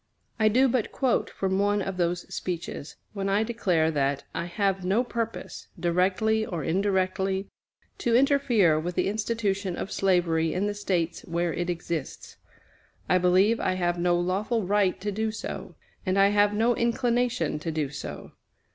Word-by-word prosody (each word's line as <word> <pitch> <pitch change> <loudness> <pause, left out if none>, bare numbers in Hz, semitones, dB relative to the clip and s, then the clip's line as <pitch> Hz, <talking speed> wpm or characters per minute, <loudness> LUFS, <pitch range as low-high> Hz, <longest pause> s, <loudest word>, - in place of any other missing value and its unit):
I 215 - +4
do 255 +5 +4
but 245 -3 0
quote 260 -3 +1
from 190 0 -1
one 205 +1 +2
of 195 -1 -3
those 175 0 0
speeches, 170 -4 -5 0.2
when 195 -1 -2
I 200 +2 +2
declare 185 -9 +1
that 140 -2 0
"I - - -3
have 195 +1 -1
no 195 +7 +2
purpose, 230 -2 -5
directly 185 +5 +2
or 170 -7 -4
indirectly, 190 +2 0 0.5
to 235 -1 +1
interfere 245 - +4
with 175 +2 -4
the - - +1
institution 205 -3 -1
of 195 - -5
slavery 170 -4 +1
in 190 +3 0
the 205 - -1
States 180 -5 -1
where 170 0 -1
it 175 0 -2
exists." 170 -4 -5 0.7
I 185 - +3
believe 185 +5 +3
I 185 - 0
have 175 -1 0
no 175 0 +2
lawful 200 +6 0
right 200 -1 +2
to 205 +1 -2
do 220 +2 -1
so; 220 - -6 0.3
and 185 +1 0
I 195 0 +6
have 205 0 +3
no 225 +3 +2
inclination 235 -8 0
to 165 +2 -3
do 150 -3 -2
so. 145 - -7
195 Hz, 165 wpm, -27 LUFS, 175-215 Hz, 0.7 s, I